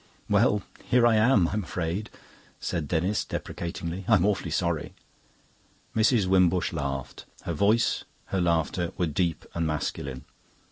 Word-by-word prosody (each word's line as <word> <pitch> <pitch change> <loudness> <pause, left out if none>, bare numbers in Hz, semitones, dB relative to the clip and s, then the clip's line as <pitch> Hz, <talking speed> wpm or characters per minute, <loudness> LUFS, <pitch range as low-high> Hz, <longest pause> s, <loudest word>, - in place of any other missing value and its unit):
"Well, 105 -1 +3 0.2
here 125 -1 +3
I 115 -1 +5
am, 110 -5 +4
I'm 105 +1 -1
afraid," 90 +5 -3 0.5
said 85 -5 -2
Denis 90 +6 0
deprecatingly. 85 +2 -5
"I'm 105 -5 +5
awfully 105 -2 0
sorry." - - -1 1.0
Mrs. 110 -1 +4
Wimbush 90 -1 +3
laughed. 70 -4 -4 0.2
Her 85 - -2
voice, 105 +8 +2 0.3
her 95 - +2
laughter, 85 0 0
were 90 - +1
deep 85 +1 -1
and 85 -1 -1
masculine. 70 -3 -3
90 Hz, 130 wpm, -27 LUFS, 85-105 Hz, 1.0 s, I